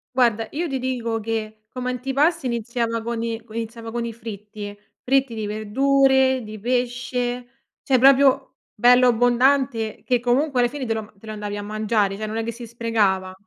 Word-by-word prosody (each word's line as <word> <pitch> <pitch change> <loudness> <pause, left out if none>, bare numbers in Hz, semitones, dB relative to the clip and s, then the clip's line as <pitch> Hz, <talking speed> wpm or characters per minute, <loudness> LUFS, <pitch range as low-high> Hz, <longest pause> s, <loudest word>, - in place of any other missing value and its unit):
Guarda, 230 -3 +3
io 335 +4 -2
ti 270 -3 -2
dico 240 -3 -2
che 215 -1 -4
come 250 0 -3
antipasto 270 +6 0
iniziava 235 -1 -2
con 230 0 -3
i 230 -1 -3
co 220 - -15
iniziava 225 0 -5
con 240 0 -2
i 235 - -3
fritti, 210 -2 -8 0.2
fritti 270 -1 +1
di 220 -1 -4
verdure, 265 +5 +3
di 215 0 -8
pesce, 245 +1 -2 0.3
cioè 270 -3 +2
proprio 270 +1 +4 0.2
bello 245 +3 +6
abbondante 245 -1 +2
che 250 -2 +1
comunque 250 +3 +1
alla 240 0 +3
fine 280 0 -5
te 225 - 0
lo 215 -1 -6
te 200 - -17
lo - - -5
andavi 210 -1 -5
a 205 - -5
mangiare, 210 -1 0
cioè 215 - -4
non 215 0 -5
è 225 - -1
che 230 - -3
si 235 +1 -9
sprecava. 215 -5 0
235 Hz, 185 wpm, -22 LUFS, 220-255 Hz, 0.3 s, bello